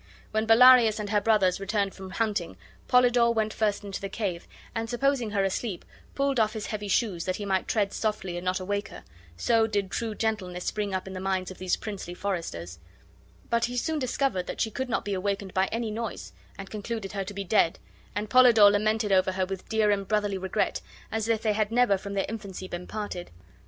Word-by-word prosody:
When 220 +1 0
Bellarius 235 -1 +7
and 210 -1 -4
her 210 -1 +3
brothers 200 -4 +3
returned 200 0 -1
from 190 -1 -9
hunting, 190 - -2 0.3
Polydore 245 -2 +4
went 215 -1 0
first 210 -2 0
into 200 -1 -5
the 195 - -4
cave, 190 -6 -3 0.3
and, 225 0 -3
supposing 250 -1 +1
her 200 -2 +1
asleep, 195 0 -2 0.3
pulled 275 -2 +1
off 215 -1 +2
his 220 -2 -4
heavy 210 -1 -4
shoes, 190 -4 0
that 185 - -1
he 205 - -5
might 190 -1 0
tread 205 -3 0
softly 210 -5 -2
and 175 - -5
not 185 +1 0
awake 200 +2 -2
her - - -11 0.3
(so 225 - +3
did 200 -3 -1
true 225 -2 -2
gentleness 190 -6 -2
spring 210 -2 -2
up 185 -1 -2
in 190 - -7
the 185 - -5
minds 190 -1 -1
of 185 - -11
these 185 -1 +1
princely 195 -4 -6
foresters); 90 - -4 0.7
but 235 0 +3
he 245 +1 -4
soon 315 +5 0
discovered 255 -7 -1
that - - -5
she 220 - 0
could 260 +4 -3
not - - -1
be 205 - -2
awakened 195 0 -2
by 190 +1 +2
any 230 -1 -2
noise, 210 - -5 0.2
and 195 0 -8
concluded 215 -1 -4
her 195 -1 -2
to 200 +2 -7
be 200 - -3
dead, 175 -3 +2 0.4
and 210 +1 -2
Polydore 230 -4 +7
lamented 215 +1 +1
over 190 0 +3
her 185 0 0
with 190 0 -7
dear 220 -2 +3
and 200 -1 -1
brotherly 205 -2 0
regret, 190 0 -1 0.3
as 220 0 -1
if 225 -1 +1
they 215 -2 +2
had 215 0 0
never 240 -3 +4
from 200 +1 -6
their 195 - +1
infancy 195 -4 -6
been 175 0 -6
parted. 205 -5 -5
205 Hz, 215 wpm, -27 LUFS, 190-225 Hz, 0.7 s, Bellarius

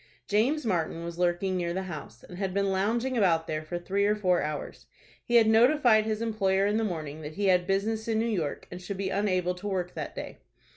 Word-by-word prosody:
James 245 +8 +1
Martin 170 -4 -1
was 170 0 -7
lurking 180 +2 +1
near 175 -1 -1
the 190 - -2
house, 150 -10 -8
and 180 - -10
had 190 -2 -2
been 200 -1 +1
lounging 230 +7 0
about 170 -7 +3
there 155 -1 -3
for 155 +3 -5
three 195 +3 -1
or 210 +1 +3
four 185 -4 +2
hours 150 -1 -5 0.4
He 240 - -1
had 230 -1 +7
notified 225 0 +5
his 220 0 -1
employer 195 -3 +1
in 205 +1 +1
the 225 - +1
morning 160 -6 -4
that 155 0 -7
he 200 0 +1
had 180 -1 +3
business 215 +3 0
in 225 -1 +1
New 225 - +1
York, 180 -11 -2
and 180 +1 -7
should 195 +1 -5
be 195 -1 -2
unable 185 -3 +1
to 180 +3 -7
work 180 -3 -2
that - - -6
day. - - -7
195 Hz, 230 wpm, -28 LUFS, 175-215 Hz, 0.4 s, had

